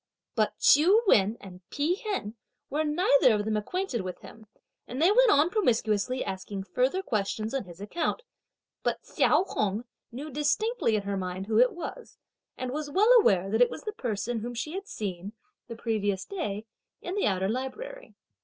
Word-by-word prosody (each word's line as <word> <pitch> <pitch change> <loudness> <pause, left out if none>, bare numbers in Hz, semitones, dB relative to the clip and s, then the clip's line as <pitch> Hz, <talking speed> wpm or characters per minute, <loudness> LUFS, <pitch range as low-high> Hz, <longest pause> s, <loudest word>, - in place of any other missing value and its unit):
But - - 0
Ch'iu 365 +10 +6
Wen 210 - +4
and 185 -2 -12
Pi 300 +4 0
Hen 390 - -3 0.4
were 300 +3 +1
neither 295 - +4
of 205 0 -1
them 220 0 0
acquainted 250 - -2
with 185 -1 -6
him, 220 0 -13 0.4
and 250 - -6
they 340 +5 +5
went - - +5
on 310 0 +4
promiscuously 245 - +1
asking 190 +1 -5
further 260 - 0
questions 215 - -2
on 270 -6 -2
his 175 -1 -13
account, 330 - -2 0.6
but - - -1
Hsiao - - +2
Hung 210 +3 -1 0.3
knew 285 +6 -7
distinctly 300 - +1
in 205 - -1
her 200 0 -2
mind 185 0 -4
who 220 +1 +2
it 250 +1 +5
was, 350 - -8 0.4
and 255 -1 -4
was 295 +1 -4
well 410 - +4
aware 195 - +2
that 220 +2 +2
it 245 - +6
was - - -8
the 425 - -4
person 235 - -3
whom 240 +2 -5
she 300 +6 -4
had 390 +2 -5
seen, 195 - -5 0.3
the 230 - -7
previous 205 -4 -1
day, 220 - -4 0.4
in 360 - -4
the 405 - +1
outer 190 -1 0
library. 445 - -5
245 Hz, 180 wpm, -28 LUFS, 205-335 Hz, 0.6 s, Ch'iu